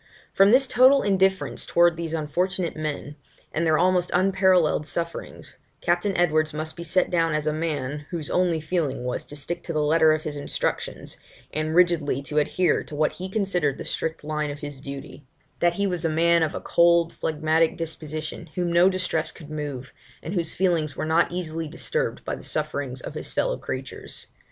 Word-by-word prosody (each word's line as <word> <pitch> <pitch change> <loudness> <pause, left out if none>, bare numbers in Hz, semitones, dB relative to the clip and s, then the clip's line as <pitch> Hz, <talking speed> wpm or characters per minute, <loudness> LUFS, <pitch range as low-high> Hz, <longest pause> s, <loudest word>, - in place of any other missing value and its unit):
From 195 +1 +6
this 260 +4 +6
total 260 +2 +5
indifference 190 -1 +1
towards 170 -1 +3
these 165 -1 -3
unfortunate 175 +3 -1
men, 150 -1 -4 0.4
and 165 +1 0
their 155 -1 +4
almost 180 0 +2
unparalleled 185 -4 +3
sufferings, 170 +3 -5 0.2
Captain 175 +3 0
Edwards 155 -3 +2
must 155 +1 -4
be - - -8
set 170 +2 +1
down 165 -2 +2
as 155 0 -1
a 155 - +1
man, 150 -2 -3
whose 165 -5 -4
only 180 -3 +2
feeling 155 -5 -2
was 125 0 -3
to 145 - -9
stick 170 +4 -4
to 165 - -5
the 155 -1 +1
letter 160 +1 +4
of 155 0 0
his 150 - -4
instructions, 145 - -3 0.4
and 155 +1 -1
rigidly 170 -6 +3
to 150 +2 0
adhere 180 +4 +1
to 150 - -9
what 155 +1 +2
he 185 +1 -7
considered 180 -9 0
the - - -7
strict 160 -1 -3
line 150 0 -2
of 145 0 -7
his 145 -2 -7
duty; 140 +1 -8 0.4
that 175 0 +2
he 200 - 0
was 180 -3 -1
a 165 - +1
man 170 +2 +3
of 160 -2 0
a - - -4
cold 170 -1 +3
phlegmatic 160 +1 +1
disposition, 155 0 -5
whom 175 -1 -1
no 175 +2 +6
distress 185 -4 -1
could 155 -2 -12
move, 145 -4 -5 0.3
and 165 - -5
whose 170 -4 +3
feelings 170 -6 0
were - - -2
not 160 +2 +2
easily 165 -2 -3
disturbed 470 - -2
by - - -2
the - - -6
sufferings - - -2
of - - -7
his - - -4
fellow - - 0
creatures. - - -7
165 Hz, 190 wpm, -25 LUFS, 155-180 Hz, 0.4 s, From